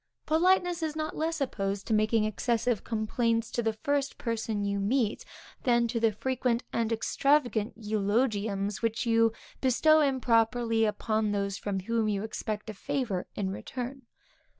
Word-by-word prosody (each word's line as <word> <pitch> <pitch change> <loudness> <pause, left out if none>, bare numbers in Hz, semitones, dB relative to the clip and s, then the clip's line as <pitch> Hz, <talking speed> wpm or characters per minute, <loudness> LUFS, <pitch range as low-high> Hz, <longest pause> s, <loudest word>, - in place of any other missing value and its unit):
Politeness 355 +2 +3
is 315 -1 -2
not 310 0 -3
less 325 +1 -1
opposed 200 -7 -2
to 225 - -1
making 215 +1 +3
excessive 230 +1 0
complaints 230 +1 0
to 240 - 0
the 225 -1 0
first 285 -1 0
person 225 -3 -2
you 200 0 -1
meet, 220 +2 0 0.4
than 240 -2 +3
to 230 0 -1
the 225 -1 +3
frequent 250 +2 -1
and 230 -1 0
extravagant 240 -1 +1
eulogiums 210 -1 0
which 230 +2 0
you 230 -1 +4 0.3
bestow 310 +5 +4
improperly 235 -4 +2
upon 215 0 0
those 200 -1 -1
from 195 -2 -2
whom 225 +2 0
you 200 -1 -1
expect 215 -1 -4
a 215 - -5
favor 205 -3 -2
in 190 -2 -2
return. 255 +6 -6
230 Hz, 150 wpm, -29 LUFS, 210-255 Hz, 0.4 s, you